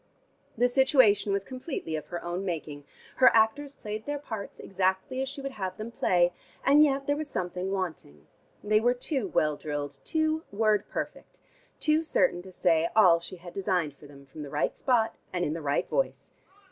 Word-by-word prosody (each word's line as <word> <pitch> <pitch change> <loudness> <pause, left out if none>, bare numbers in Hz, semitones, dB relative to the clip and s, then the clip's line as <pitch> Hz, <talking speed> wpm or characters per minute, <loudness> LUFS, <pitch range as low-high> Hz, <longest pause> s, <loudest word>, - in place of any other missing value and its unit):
The 245 +2 +4
situation 250 -6 +4
was 200 0 0
completely 255 - -5
of 155 - -5
her 175 -1 -5
own 175 +2 -3
making: 155 -5 -5 0.3
her 255 - +8
actors 275 +6 +2
played 215 +1 -6
their 290 0 -1
parts 220 -8 -7
exactly 190 +7 -1
as 265 - -2
she 280 0 -7
would 275 0 -4
have 190 -6 -5
them 220 +2 -6
play, 175 -5 +2 0.3
and 290 +2 +7
yet 275 -2 +1
there 285 - +1
was 300 0 -5
something 180 -3 -3
wanting. 160 - -4 0.4
They 215 +1 +3
were 245 +3 +2
too 255 -3 -1
well 150 -4 +1
drilled, 145 -2 -5
too 315 0 0
word 210 0 +1
perfect, - - -6 0.4
too 305 +1 +3
certain 270 - +1
to 190 +1 -12
say 170 -2 +2
all 180 -6 +7
she 170 +2 -8
had 175 0 -11
designed 180 -7 -1
for 145 - -15
them 140 -1 -15
from 145 +3 -10
the 145 - -6
right 150 +1 -1
spot, 240 -4 +1
and 180 -1 -1
in 150 - -1
the 165 - -5
right 145 -1 0
voice. - - -2
200 Hz, 190 wpm, -28 LUFS, 170-260 Hz, 0.4 s, her